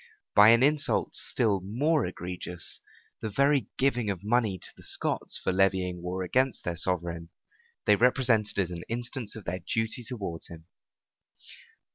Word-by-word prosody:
By 105 +1 +8
an 115 +2 +6
insult 150 +1 +2
still 105 -5 +1
more 135 - +1
egregious, 90 -1 -5 0.4
the 110 - -2
very 140 +1 +2
giving 125 -5 +1
of 95 -2 -3
money 110 -3 +1
to - - -7
the - - -16
Scots - - -2
for - - -1
levying 95 -2 +1
war 90 +1 -3
against 130 +7 +1
their 85 - -2
sovereign, 85 -1 -2 0.6
they 105 - +6
represented 120 -3 +2
as 95 -3 0
an 85 -1 -5
instance 120 -1 -4
of 110 - -8
their 90 +1 -3
duty 110 +6 -2
towards 100 -9 -5
him. 80 -1 -12
105 Hz, 150 wpm, -28 LUFS, 90-120 Hz, 0.6 s, By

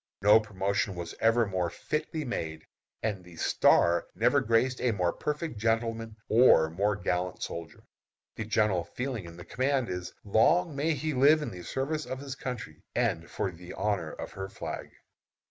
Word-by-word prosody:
No 105 +2 +8
promotion 100 -2 -1
was 85 -1 -5
ever 115 +1 +4
more 90 -3 -1
fitly 155 - -3
made, 80 -10 -4 0.4
and 105 -4 -2
the 90 -1 -14
"star" 85 +1 +3
never - - +3
graced 115 +3 +2
a 120 -2 +2
more 90 -4 +1
perfect 150 -5 -3
gentleman 115 0 0
or 110 -9 +6
more 100 +5 +1
gallant 90 -1 -2
soldier. 85 -1 -7 0.5
The 110 - -4
general 105 -5 +2
feeling 125 +1 -4
in 85 0 -10
the 90 - -10
command 130 0 0
is, 90 0 -4
long 150 - +3
may 155 +3 +1
he 155 +1 -2
live 145 +4 +5
in - - -4
the 90 - -8
service 150 - -2
of 130 - -4
his 140 -1 -6
country 120 - -6
and 85 +1 0
for 95 - -2
the 90 +1 -10
honor 100 -7 -1
of - - -7
her 95 0 -6
flag. - - -6
110 Hz, 170 wpm, -29 LUFS, 90-130 Hz, 0.5 s, No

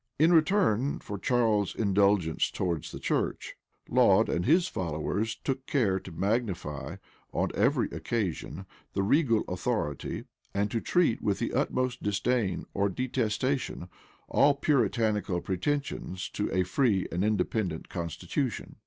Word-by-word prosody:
In 160 +4 +5
return 155 - +3
for 100 -1 -7
Charles's 110 -5 +1
indulgence 100 -5 +2
towards 85 -4 -2
the - - -6
church, - - -2 0.3
Laud - - +4
and 85 - -1
his 170 +5 +4
followers 95 - -2
took 135 -1 -4
care 105 -10 +2
to 95 - -10
magnify, 85 - -2 0.4
on - - 0
every - - +2
occasion, 105 -8 -3 0.3
the 100 - 0
regal 115 0 +3
authority, 90 - -2 0.3
and 100 +1 0
to 115 - -1
treat 175 -10 +2
with 100 -2 0
the - - -2
utmost 125 -1 0
disdain 105 0 0
or 100 +1 +1
detestation 125 -2 -1 0.4
all 140 0 +4
Puritanical 110 - +1
pretensions 95 -2 -2
to 105 - -2
a 95 - +2
free 100 0 +1
and 90 +3 -1
independent 105 -5 -1
constitution. 90 - -3
105 Hz, 125 wpm, -29 LUFS, 95-125 Hz, 0.4 s, In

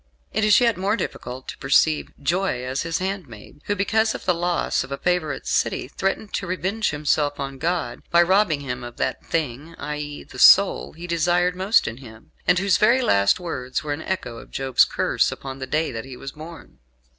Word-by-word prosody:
It - - 0
is 210 -1 +6
yet 235 -3 +2
more 195 +3 +1
difficult 130 - -6
to - - -8
perceive 155 +2 +2
"joy 165 -3 0
as 130 +2 -2
his 165 0 -2
handmaid" 160 - -6
who, 205 - 0
because 220 +3 +1
of - - -8
the 180 - +3
loss 175 -3 0
of 135 - -11
a 140 - -2
favourite 175 -3 -1
city, - - 0
threatened 195 +2 -3
to 195 - -2
revenge 190 +4 -1
himself 145 0 0
on 135 -1 -5
God, 165 -6 -2
by 170 0 +5
robbing 185 -4 +2
Him 125 -2 -5
of 120 0 -9
that - - -2
thing 155 +1 -3
i.e., 150 0 -5
the - - -12
soul 200 0 +6
He 170 +2 -9
desired 175 +1 +1
most 190 +4 +3
in 115 - -5
him; 110 -4 -14 0.2
and 180 - +5
whose 195 0 +3
very 235 +5 +4
last 100 - +3
words 130 -8 -4
were 150 -1 -2
an 145 - -6
echo 125 -12 -4
of - - -14
Job's 135 -2 +3
curse - - 0
upon 135 0 -7
the 130 - -5
day 155 +2 0
that 115 -1 -6
he 130 -2 -9
was 135 - -7
born. 160 +2 -12
160 Hz, 205 wpm, -23 LUFS, 135-185 Hz, 0.2 s, is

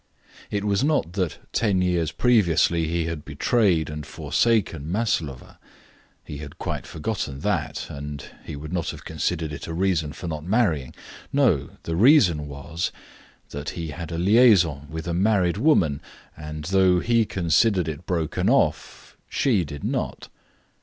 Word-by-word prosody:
It 100 -1 -2
was 100 +1 +1
not 145 - +1
that 90 -4 -1 0.2
ten 100 -5 +2
years 85 -3 0
previously 85 -8 +3
he 85 0 -1
had 80 -3 -4
betrayed 85 - +1
and 75 0 -6
forsaken 85 - 0
Maslova; 90 - -2 0.6
he 70 - -8
had 75 -1 -9
quite - - -4
forgotten 80 -6 -4
that, - - -1
and 70 0 -7 0.2
he - - -7
would 75 +4 -7
not 85 -4 -1
have - - -8
considered 80 -1 -2
it 70 - -7
a 80 - -4
reason 85 -5 0
for 85 - -7
not 75 -2 -4
marrying. 90 - 0 0.4
No! - - +1
The 80 - -3
reason 90 - +5
was 70 +4 -4 0.6
that 70 +1 -5
he 85 -2 -4
had 80 +3 -7
a 85 - -3
liaison 90 - +4
with 80 +1 -6
a 85 - -1
married 95 -1 +2
woman, 95 - +3 0.3
and, 75 0 -7
though 95 -1 +4
he 115 +3 +2
considered 90 0 +2
it 80 +2 -6
broken 85 -5 0
off, - - 0
she 110 -10 +2
did 75 -2 -8
not. - - -3
85 Hz, 155 wpm, -24 LUFS, 75-100 Hz, 0.6 s, reason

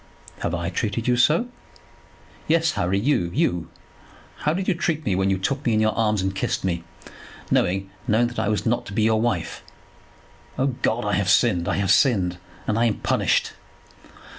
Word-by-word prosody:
"Have 85 - -2
I 85 0 -3
treated 110 +5 -2
you 125 - +3
so?" 150 - +3 1.0
"Yes, 165 0 +3
Harry; 95 - 0
you, 105 -7 +1
you. 85 -1 0 0.7
How 150 - 0
did 190 +1 -3
you - - +3
treat 165 -2 -2
me 100 - +1
when 95 +1 +1
you 95 - +1
took 135 +9 -2
me 115 -5 +1
in - - +2
your 110 0 +2
arms 105 -3 +1
and 95 0 -1
kissed 95 - -2
me, 85 -3 -1 0.7
knowing, 95 +2 +1 0.2
knowing 115 +1 +3
that 120 - -6
I 110 -2 0
was 105 - -1
not 120 +1 0
to 100 - -8
be 110 +1 +1
your 110 0 +3
wife? 110 -8 -2 1.0
O 130 - +1 0.2
God, - - 0
I - - 0
have - - +1
sinned. 85 -1 +3
I - - 0
have 100 -2 +1
sinned, 95 -9 +3 0.3
and 110 +1 0
I 120 - +3
am 110 -3 +1
punished." - - +1
110 Hz, 190 wpm, -23 LUFS, 95-120 Hz, 1.0 s, you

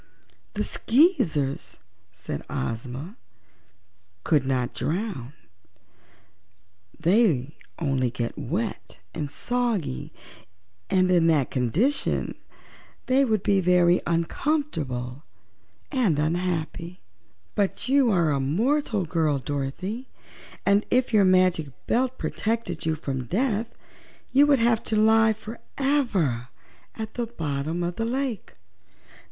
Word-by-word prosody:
"The - - 0
Skeezers," 210 - +1 0.3
said - - -6
Ozma, 125 - -4 1.1
"could 145 -4 +2
not 125 -2 0
drown; 160 - -3 1.7
they 165 - +2 0.2
only 135 -6 0
get 120 -2 -4
wet 195 - -4 0.2
and 150 -3 -3
soggy 225 - -1 0.8
and 185 -1 +3
in 170 -2 +4
that 150 -5 +2
condition 160 - 0 0.7
they 265 +2 +4
would 215 -6 +1
be 200 -1 +3
very 180 -1 +4
uncomfortable 165 - -1 0.7
and 235 - +2
unhappy. 170 +2 -2 0.5
But 200 +3 -1
you 270 -2 +4
are 170 -7 +3
a 140 - +1
mortal 215 - +1
girl, 155 -3 +1
Dorothy, 145 - -4 0.6
and 200 +1 +4
if 250 -1 +2
your 205 -2 +6
Magic 185 -4 +3 0.2
Belt 255 +1 +1
protected 215 -8 -2
you 160 - +2
from 135 -4 -4
death 225 - 0 0.7
you 285 +2 +6
would 285 -1 +5
have 230 -1 +3
to 220 - 0
lie 220 +1 +5
forever 220 - -1 0.5
at 220 -1 -6
the 240 -1 -2
bottom 160 -4 -3
of 175 0 -3
the 225 - -1
lake." 255 -2 -3
180 Hz, 105 wpm, -25 LUFS, 145-230 Hz, 1.7 s, your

